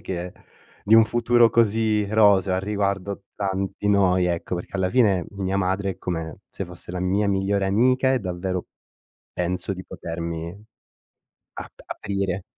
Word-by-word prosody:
che 90 0 -5 0.5
di 105 - +4
un 115 - +7
futuro 120 +1 +3
così 110 -1 +2
roseo, 100 -3 +4
a - - +1
riguardo 100 0 -2
tanti 95 0 -2
noi, 95 -3 +3
ecco, 90 0 -2
perché, 90 - -8
alla 95 -1 0
finec, 105 -8 +3
mia 95 -1 -2
madre, 95 +1 0
è - - -8
come 80 -3 -4
se 95 - -5
fosse 90 -1 -10
la 90 - -4
mia 95 +3 +1
migliore 95 0 +1
amica 130 +6 +3
e 130 - +2
davvero 90 -2 -3 0.7
penso 90 +2 -2
di 95 0 -9
potermi 85 0 -5 1.0
ap - - -9
aprire. 100 -2 -3
95 Hz, 150 wpm, -24 LUFS, 90-105 Hz, 1.0 s, un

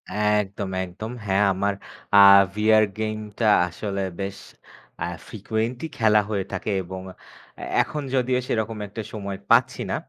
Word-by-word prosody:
একদম, 105 -2 0
একদম। 95 +5 -7
হ্যাঁ 100 +1 +2
আমার 100 +2 0 0.4
আ - - +9 0.4
VR 110 0 +4 0.2
গেমটা 110 0 -3 0.2
আসলে 100 +2 -4 0.2
বেশ 100 0 -4 0.7
আ - - 0 0.2
frequently 110 +6 -3
খেলা 110 -2 +4
হয়ে 100 -3 -1
থাকে 95 - -4
এবং 95 +1 -7 0.6
এ - - -6 0.2
এখন 150 - -5
যদিও 125 0 +1
সেরকম 110 0 -2
একটা 110 +3 -6
সময় 100 -2 -5
পাচ্ছি - - +4
না - - 0
105 Hz, 135 wpm, -24 LUFS, 100-110 Hz, 0.7 s, আ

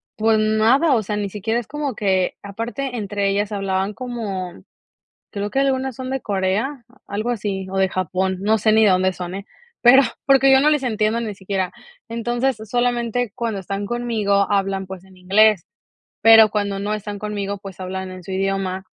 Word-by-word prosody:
pues 220 0 +2
nada, 220 +8 +3
o 230 - +2
sea, 210 0 -3
ni 205 -1 -2
siquiera 220 +4 -2
es 235 - -8
como 290 -4 -4
que 190 -3 0
aparte 235 +6 -5
entre 205 -2 -2
ellas 205 +1 -1
hablaban 195 0 -1
como, 215 -8 -5 0.8
creo 200 +1 -3
que 270 - -1
algunas 265 -2 0
son 255 +1 -6
de 270 0 -2
Corea, 205 +7 -1 0.2
algo 215 +4 -3
así, 200 -5 -3
o 195 - -3
de 190 0 +3
Japón, 185 +1 -1
no 215 +2 +2
sé 215 +1 +2
ni 220 0 +5
de 205 - +5
dónde 185 0 +2
son, 180 0 -6
eh, 200 0 -7 0.4
pero, 255 +3 +8 0.2
porque, 270 0 +5
yo 265 - +7
no 295 +3 +4
les 295 -3 +1
entiendo 220 -2 0
ni 220 -3 -4
siquiera, 190 -1 -3 0.4
entonces, 240 +2 -1
solamente 240 -1 0
cuando 225 -4 -3
están 200 +2 -4
conmigo 215 -4 0
hablan, 195 -1 0
pues, 190 0 -9
en 190 -1 -19
inglés, 195 +1 +3 0.6
pero 225 0 +8
cuando 205 -1 -2
no 205 +2 -2
están 205 -1 -5
conmigo, 200 -1 -4
pues, 195 -2 -10
hablan 190 0 -5
en 185 0 -10
su 180 - -10
idioma, 190 0 -2
210 Hz, 185 wpm, -21 LUFS, 195-235 Hz, 0.8 s, pero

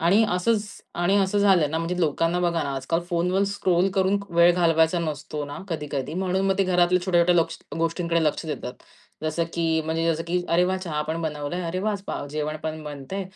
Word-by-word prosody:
आणि 190 +7 +4
असंच 205 +4 +1 0.3
आणि 175 +3 +2
असं 195 +1 +1
झालं 190 -7 +4
ना, 160 - -1
म्हणजे 170 +2 -2
लोकांना 165 +2 +1
बघा 170 -2 +1
ना, 140 -1 -3
आजकाल 135 +6 -1
फोनवर 180 +2 +1
स्क्रोल 185 -2 +2
करून 190 +1 +2 0.2
वेळ 170 +1 +6
घालवायचा 165 -1 +3
नसतो 150 -2 -4
ना 145 0 -7
कधी-कधी. 150 -3 -3
म्हणून 190 +1 0
मग 195 0 +1
ते 195 - +4
घरातल्या 180 0 +2
छोट्या-छोट्या 175 -1 +3
लोक्स 165 -1 +1 0.2
गोष्टींकडे 165 0 0
लक्ष 150 +1 -1
देतात. 140 -4 -4 0.5
जसं 155 +2 0
की 165 -1 +1
म्हणजे 160 +1 -1
जसं 165 +1 -3
की 180 +1 0
अरे 170 +2 +3
वाह! 185 +1 0
चहा 165 -5 -3
पण 160 +2 -3
बनवलंय. 150 +3 -3
अरे 170 +2 -2
वाह! 215 +2 0
आज 200 -2 -5
पाव - - -4
अ, - - -9
जेवण 155 +1 -2
पण 155 0 -4
बनतंय. 150 +7 -5
170 Hz, 205 wpm, -24 LUFS, 155-180 Hz, 0.5 s, वेळ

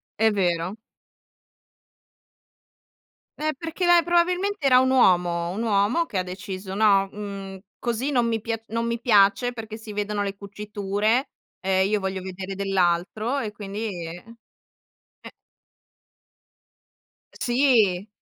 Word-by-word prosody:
È 220 0 +3
vero. 180 0 0 2.6
Eh, 310 +1 -1
perché 330 +4 -3
lei 350 0 +6
probabilmente 355 0 +1
era 255 -2 +6
un 260 0 +3
uomo, 175 -8 +3
un 205 +5 -4
uomo 220 +9 +2
che 205 - -5
ha 185 - +1
deciso: 190 +1 -7
"No, 200 -1 +4
mhmm, 195 -2 -7 0.2
così 240 +3 -2
non 245 -3 +2
mi 225 -1 -1
pia 225 0 -3
non 230 +1 -1
mi 235 0 -2
piace 210 +1 +4
perché 220 -1 -7
si 220 -2 -9
vedono 210 0 -2
le 200 0 -3
cuciture 205 +4 -1 0.3
e 190 0 +2
io 210 +1 +1
voglio 190 -1 -3
vedere 190 +1 -6
dell'altro", 195 +6 0
e 220 -5 -3
quindi 205 +1 -6 0.2
eh. 175 +2 -9 1.0
Eh. - - -11 2.0
Eh, - - -14
sì. 235 -7 +3
210 Hz, 130 wpm, -24 LUFS, 195-240 Hz, 2.6 s, lei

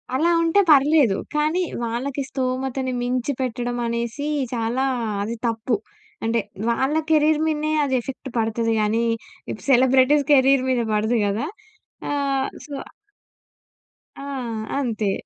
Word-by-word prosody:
అలా 320 +6 +2
ఉంటే 330 +4 +3
పర్లేదు. 280 -6 +5 0.2
కానీ 310 +4 +1 0.2
వాళ్ళకి 255 +5 -3
స్తోమతని 260 0 -2
మించి 250 +2 -1
పెట్టడం 245 -1 -2
అనేసి 235 +5 -2 0.3
చాలా 235 +3 0 0.4
అది 225 +3 -3
తప్పు. 230 +1 0 0.5
అంటే 230 +1 +1 0.3
వాళ్ళ 265 +5 +1
కెరీర్ 310 -1 +4
మీదనే 310 0 0
అది 265 -2 0
ఎఫెక్ట్ 265 +2 -7
పడతది 225 0 0
కానీ 215 +2 +1 0.5
ఇప్పుడు - - -6
సెలబ్రిటీస్ 260 +3 +5
కెరీర్ 270 -1 +5
మీద 250 -2 +2
పడదు 220 +3 +1
కదా! 205 +6 -1 0.7
ఆహ్, 275 -2 0 0.2
సో 290 - -9 1.4
ఆ! - - -8 0.6
అంతే. 220 -6 -1
260 Hz, 120 wpm, -22 LUFS, 235-285 Hz, 1.4 s, పర్లేదు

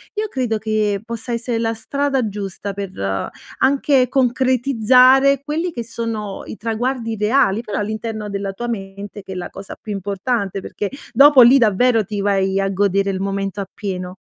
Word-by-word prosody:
io 425 +1 -1
credo 250 - -1
che 215 -2 -1
possa 235 +1 -6
essere 235 0 -2
la 225 0 0
strada 270 +2 -1
giusta 200 -1 -5
per 195 -1 -5 0.7
anche 270 -1 +3
concretizzare 260 +1 +4
quelli 320 +4 -2
che 240 -7 -5
sono 225 -3 -5
i - - -8
traguardi 230 +1 -2
reali, 215 0 +2
però 210 -4 -5
all'interno 215 0 -4
della 200 -1 -3
tua 240 +5 -6
mente 200 -2 -6
che 190 - -10
è - - -8
la 180 - -5
cosa 195 0 -10
più 215 - -5
importante. 200 +1 -2
Perché 200 +1 -4 0.2
dopo 275 +2 +8
lì 245 +3 +8
davvero 225 0 +3
ti 205 +1 -5
vai 195 -1 +1
a 195 - +1
godere 195 0 +1
il 190 - -3
momento 195 0 -2
appieno. 185 -2 -5
220 Hz, 165 wpm, -19 LUFS, 200-250 Hz, 0.7 s, dopo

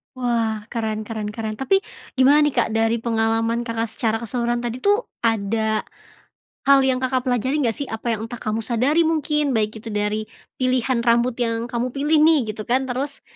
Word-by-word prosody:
Wah, 230 -4 -1
keren 220 -2 -2
keren 215 -1 -5
keren, 215 -1 -5
tapi 390 +9 +2 0.3
gimana 270 +3 +5
nih, 295 - 0
Kak, - - +2
dari 225 +1 +2
pengalaman 225 0 0
Kakak 230 0 -2
secara 225 -2 0
keseluruhan 240 +1 -1
tadi 240 +1 -3
tuh, 410 - +2 0.2
ada 220 -1 0 0.8
hal 275 0 +7
yang 260 -1 +2
Kakak 255 -1 0
pelajari 255 +4 +1
nggak 230 -3 +1
sih? 285 - -4
Apa 225 +1 -2
yang 220 +1 -5
entah 240 0 -8
kamu 215 +1 -1
sadari 255 +8 +2
mungkin 300 -2 +1
baik 215 0 -1
itu 225 - -8
dari 210 +1 -1 0.4
pilihan 255 -1 +1
rambut 235 +1 +3
yang 230 -1 -1
kamu 240 +1 -1
pilih 295 +3 +2
nih 320 -1 +5
gitu 215 - -6
kan, 255 +2 +2
terus, 275 +3 -3
235 Hz, 180 wpm, -22 LUFS, 225-260 Hz, 0.8 s, hal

